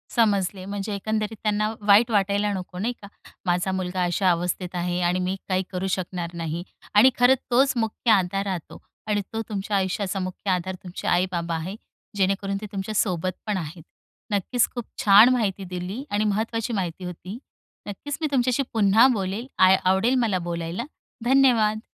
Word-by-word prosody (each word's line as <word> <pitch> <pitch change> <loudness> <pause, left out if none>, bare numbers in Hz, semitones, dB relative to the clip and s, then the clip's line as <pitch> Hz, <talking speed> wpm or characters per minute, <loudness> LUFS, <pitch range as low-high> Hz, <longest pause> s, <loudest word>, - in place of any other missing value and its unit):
समजले, 200 -5 +1
म्हणजे 200 +1 -4
एकंदरीत 215 +2 -2
त्यांना 215 0 +1
वाईट 215 +4 +6
वाटायला 205 0 +1
नको, 180 -1 -6
नाही 230 +5 -1
का. 200 - -10 0.4
माझा 180 +1 +1
मुलगा 185 -1 -2
अशा 180 +2 +1
अवस्थेत 180 +1 -2
आहे 175 0 -1
आणि 175 +1 +1
मी 185 +1 -1
काही 185 0 +1
करू 185 0 -2
शकणार 175 -2 -5
नाही. 170 0 -4 0.3
आणि 220 +6 +8
खरंच 250 +2 +6
तोच 265 +3 +4
मुख्य 225 +1 0
आधार 195 -1 +2
राहतो 185 -5 -5 0.3
आणि 205 -1 +1
तो 225 - -1
तुमच्या 200 -1 -1
आयुष्याचा 195 +1 -1
मुख्य 185 +2 -4
आधार 185 +1 -1
तुमचे 180 -1 -7
आई-बाबा 175 -2 0
आहे, 170 +5 -4 0.4
जेणेकरून 195 +1 0
ते - - -5
तुमच्यासोबत 190 -3 -1 0.2
पण 210 -2 0
आहेत. 165 -1 -6 0.5
नक्कीच, 210 +5 +1
खूप 240 -2 -4 0.2
छान 210 +4 +8
माहिती 200 -5 -1
दिली 180 +7 -5
आणि 205 +1 +1
महत्त्वाची 225 +3 -1
माहिती 185 -3 -3
होती. 180 +4 -7 0.5
नक्कीच, 275 +8 -5
मी 310 - +1
तुमच्याशी 255 0 +2
पुन्हा 220 +2 +5
बोलेल. 200 +3 -3
आ 185 0 +7
आवडेल 190 +7 +3
मला 200 -5 +1
बोलायला. 170 +6 -3 0.4
धन्यवाद! 235 -5 +3
195 Hz, 160 wpm, -24 LUFS, 180-215 Hz, 0.5 s, आणि